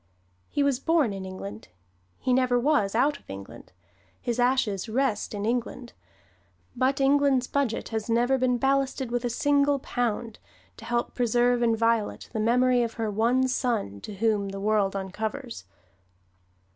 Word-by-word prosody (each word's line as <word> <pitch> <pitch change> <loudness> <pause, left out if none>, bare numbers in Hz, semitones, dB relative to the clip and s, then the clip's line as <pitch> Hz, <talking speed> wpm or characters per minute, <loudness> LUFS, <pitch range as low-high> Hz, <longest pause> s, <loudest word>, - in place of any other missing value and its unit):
He 285 - 0
was 275 -3 +1
born 300 -7 +2
in 190 -1 -6
England; 110 - -8 0.5
he 255 - 0
never 250 -1 +3
was 240 -7 +1
out 280 +4 +2
of - - -29
England; 95 0 -10 0.5
his 240 0 -3
ashes 245 -5 +1
rest 240 -2 0
in 205 0 -3
England. 240 +1 -3 0.8
But 265 +2 +1
England's 275 -2 +3
Budget 270 -4 -1
has 220 0 -3
never 245 +3 +2
been 250 -1 +2
ballasted 270 -1 0
with 245 0 -1
a - - 0
single 285 +3 +2
pound 235 -4 -3 0.4
to 225 - -11
help 240 +1 -1
preserve 245 0 +2
inviolate 230 -1 0
the 220 - -2
memory 245 +3 +3
of 230 -1 -2
her 220 -2 -2
one 240 +5 +2
son 230 - -1
to 210 - -8
whom 205 -1 0
the 195 0 -6
world 205 -1 +1
uncovers. 215 - -5
240 Hz, 150 wpm, -26 LUFS, 215-260 Hz, 0.8 s, never